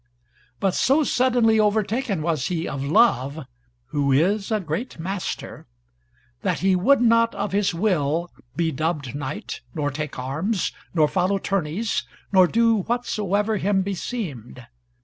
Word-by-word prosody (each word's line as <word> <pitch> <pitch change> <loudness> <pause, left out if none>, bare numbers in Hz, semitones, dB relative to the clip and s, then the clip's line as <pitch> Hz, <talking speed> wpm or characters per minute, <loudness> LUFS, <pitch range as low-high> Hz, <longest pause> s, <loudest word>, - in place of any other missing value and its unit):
But 195 -2 +1
so 280 +9 +3
suddenly 245 -5 +3
overtaken 215 - +1
was 160 -5 0
he 170 -2 -2
of 135 -1 -4
Love, 145 - +2 0.4
who 140 -1 0
is 195 +9 +2
a 215 -2 +1
great 175 - -4
master, 185 +3 -5 0.7
that - - -1
he 190 0 +3
would 245 +9 +4
not, 230 -1 +4
of - - -2
his 200 0 +1
will, 170 -3 0 0.2
be 165 -1 0
dubbed 150 -3 -2
knight, 145 0 -5
nor 145 -2 -1
take 150 +1 -5
arms, 160 - -1 0.2
nor 155 -2 +4
follow 190 +4 +1
tourneys, 195 +2 -1 0.3
nor 185 -2 +6
do 230 +2 +3
whatsoever 210 -1 -1
him 195 0 +1
beseemed. 170 - -5
190 Hz, 135 wpm, -23 LUFS, 155-220 Hz, 0.7 s, nor